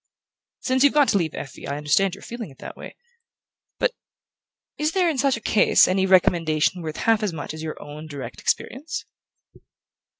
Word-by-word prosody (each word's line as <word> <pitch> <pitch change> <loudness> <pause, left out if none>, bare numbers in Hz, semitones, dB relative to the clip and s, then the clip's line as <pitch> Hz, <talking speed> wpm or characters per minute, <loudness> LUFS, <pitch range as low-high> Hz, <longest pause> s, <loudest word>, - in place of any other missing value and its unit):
"Since 260 0 +2
you've 285 0 +4
got 290 -2 +5
to 200 - +3
leave 160 -3 -2
Effie 135 - -8
I 140 - -3
understand 160 +6 +2
your 200 - -14
feeling 235 -5 -7
in 135 - -16
that - - -9
way. - - -10 0.8
But - - +1 0.9
is 305 +2 0
there, 370 -2 +2
in 310 -5 0
such 275 -2 +2
a - - -10
case, 210 - +4
any 190 +1 +1
recommendation 175 -2 +3
worth 155 -2 -5
half 225 -1 +2
as 205 -5 -1
much 155 -1 -6
as 155 - -7
your 160 -1 -5
own 150 +2 -9
direct 125 -7 -8
experience?" 295 +6 -2
190 Hz, 180 wpm, -23 LUFS, 155-255 Hz, 0.9 s, got